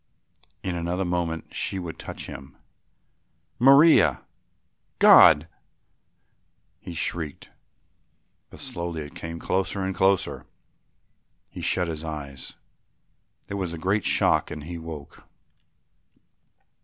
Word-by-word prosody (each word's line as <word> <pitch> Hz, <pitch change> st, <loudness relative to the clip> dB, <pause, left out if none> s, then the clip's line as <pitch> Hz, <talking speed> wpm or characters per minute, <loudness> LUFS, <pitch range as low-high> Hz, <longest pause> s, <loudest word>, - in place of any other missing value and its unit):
In 90 Hz, -2 st, -2 dB
another 85 Hz, +3 st, -2 dB
moment 85 Hz, -2 st, -3 dB
she 95 Hz, -, -3 dB
would 85 Hz, -3 st, -6 dB
touch -, -, -7 dB
him. 65 Hz, +1 st, -10 dB, 1.0 s
"Maria! 140 Hz, +6 st, +6 dB, 0.7 s
God!" 75 Hz, +2 st, +7 dB, 1.3 s
he 85 Hz, -, -9 dB
shrieked, 80 Hz, -2 st, -4 dB, 1.0 s
but -, -, -14 dB
slowly 85 Hz, -2 st, -5 dB
it 75 Hz, -, -11 dB
came 85 Hz, 0 st, -7 dB
closer 95 Hz, +3 st, -1 dB
and 95 Hz, 0 st, -2 dB
closer. 95 Hz, 0 st, +1 dB, 1.0 s
He -, -, -8 dB
shut 90 Hz, -, 0 dB
his 80 Hz, -1 st, -5 dB
eyes; 70 Hz, -4 st, -7 dB, 0.9 s
there 100 Hz, -, -5 dB
was 90 Hz, -4 st, -3 dB
a -, -, -5 dB
great 95 Hz, +5 st, 0 dB
shock -, -, +2 dB
and 75 Hz, -1 st, -7 dB
he 85 Hz, +2 st, -7 dB
woke. 80 Hz, -3 st, -10 dB
85 Hz, 105 wpm, -25 LUFS, 80-95 Hz, 1.3 s, God